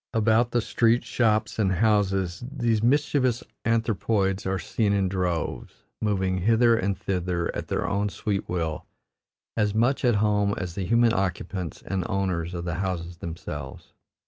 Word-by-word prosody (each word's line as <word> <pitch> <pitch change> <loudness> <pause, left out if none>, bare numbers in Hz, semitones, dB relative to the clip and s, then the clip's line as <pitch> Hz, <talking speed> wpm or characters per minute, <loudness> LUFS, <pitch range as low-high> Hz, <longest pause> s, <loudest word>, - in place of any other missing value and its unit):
About 110 +2 +3
the 120 0 +1
streets, 115 +1 +2
shops, 110 -2 +1
and 95 -3 +2
houses 95 -2 +1
these 120 -6 +1
mischievous 130 -1 +2 0.2
anthropoids 105 -3 +1
are 95 0 0
seen 105 +1 0
in 100 -2 +2
droves, 90 -3 -3 0.2
moving 95 -3 0
hither 115 +4 +4
and 100 -3 -1
thither 90 -2 -2
at - - -4
their - - -1
own 100 +1 0
sweet 100 0 -3
will, 80 -3 -2 0.7
as 105 -2 +1
much 120 +6 +2
at 120 -3 +4
home 105 -1 +2
as 90 -3 -4
the 95 +1 -3
human 115 0 +4
occupants 95 -2 -3
and 95 -2 -2
owners 90 -3 -1
of 85 0 -4
the 85 - -2
houses 90 -2 -3
themselves. 80 -5 -7
100 Hz, 150 wpm, -26 LUFS, 90-115 Hz, 0.7 s, hither